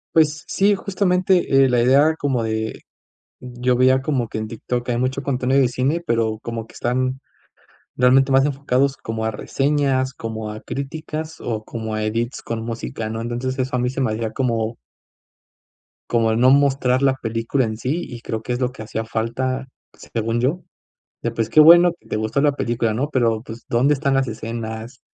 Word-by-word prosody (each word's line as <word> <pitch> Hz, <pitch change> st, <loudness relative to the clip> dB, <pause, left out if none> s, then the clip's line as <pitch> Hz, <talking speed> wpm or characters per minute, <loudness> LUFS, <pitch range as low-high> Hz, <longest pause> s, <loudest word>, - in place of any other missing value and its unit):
Pues 155 Hz, +1 st, +3 dB
sí, 200 Hz, +1 st, +3 dB
justamente 185 Hz, -7 st, +2 dB
eh, -, -, +4 dB
la 120 Hz, -1 st, +2 dB
idea 140 Hz, +6 st, +4 dB
como 135 Hz, -4 st, 0 dB
de 110 Hz, 0 st, -3 dB, 0.6 s
yo 125 Hz, 0 st, -1 dB
veía 130 Hz, +1 st, +4 dB
como 130 Hz, -6 st, -1 dB
que -, -, -5 dB
en 110 Hz, -, -3 dB
TikTok 120 Hz, +2 st, -4 dB
hay 120 Hz, -, 0 dB
mucho 130 Hz, +2 st, -1 dB
contenido 130 Hz, 0 st, +1 dB
de 130 Hz, -, +4 dB
cine 135 Hz, +7 st, 0 dB
pero 110 Hz, -2 st, 0 dB
como 115 Hz, -1 st, -5 dB
que -, -, -17 dB
están 130 Hz, +2 st, -1 dB, 0.8 s
realmente 130 Hz, +2 st, +4 dB
más 135 Hz, 0 st, +5 dB
enfocados 140 Hz, -1 st, 0 dB
como 110 Hz, 0 st, -4 dB
a 110 Hz, -, 0 dB
reseñas, 135 Hz, +2 st, 0 dB
como 110 Hz, -2 st, -5 dB
a 110 Hz, -, -7 dB
críticas 155 Hz, +3 st, -5 dB
o 110 Hz, -2 st, -3 dB
como 110 Hz, -1 st, -5 dB
a 110 Hz, -, -2 dB
edits 115 Hz, +3 st, -2 dB
con 115 Hz, -1 st, -4 dB
música, 110 Hz, -, -4 dB
¿no? 110 Hz, 0 st, -4 dB
Entonces 120 Hz, +3 st, -3 dB
eso 130 Hz, 0 st, -1 dB
a -, -, 0 dB
mí 125 Hz, -, +1 dB
se 135 Hz, +1 st, -3 dB
me 120 Hz, -, +1 dB
hacía 110 Hz, 0 st, -3 dB
como 115 Hz, -3 st, -1 dB, 1.3 s
como 115 Hz, -2 st, +2 dB
el 110 Hz, -, +1 dB
no 130 Hz, +2 st, +6 dB
mostrar 135 Hz, -2 st, +3 dB
la 135 Hz, -1 st, +3 dB
película 115 Hz, +2 st, -1 dB
en 110 Hz, -1 st, -4 dB
sí 140 Hz, +9 st, -2 dB
y 120 Hz, -2 st, -9 dB
creo 110 Hz, -1 st, -4 dB
que 125 Hz, -, -2 dB
es 120 Hz, -, -2 dB
lo 125 Hz, -1 st, 0 dB
que 125 Hz, -, -9 dB
hacía 110 Hz, +1 st, -4 dB
falta 130 Hz, +4 st, -2 dB, 0.3 s
según 115 Hz, +1 st, -3 dB
yo. 150 Hz, +8 st, 0 dB, 0.6 s
De, 120 Hz, -, 0 dB
pues 115 Hz, -1 st, -2 dB
qué 155 Hz, -, +6 dB
bueno 170 Hz, +2 st, +8 dB
que -, -, -26 dB
te -, -, -2 dB
gustó 110 Hz, +5 st, 0 dB
la 145 Hz, 0 st, +3 dB
película, 120 Hz, -4 st, -1 dB
¿no? 135 Hz, +6 st, -1 dB
Pero 115 Hz, -5 st, +1 dB
pues, 115 Hz, -1 st, -10 dB
¿dónde 130 Hz, +5 st, +3 dB
están 140 Hz, -1 st, 0 dB
las 135 Hz, -1 st, +2 dB
escenas? 110 Hz, +1 st, -6 dB
125 Hz, 195 wpm, -21 LUFS, 115-135 Hz, 1.3 s, bueno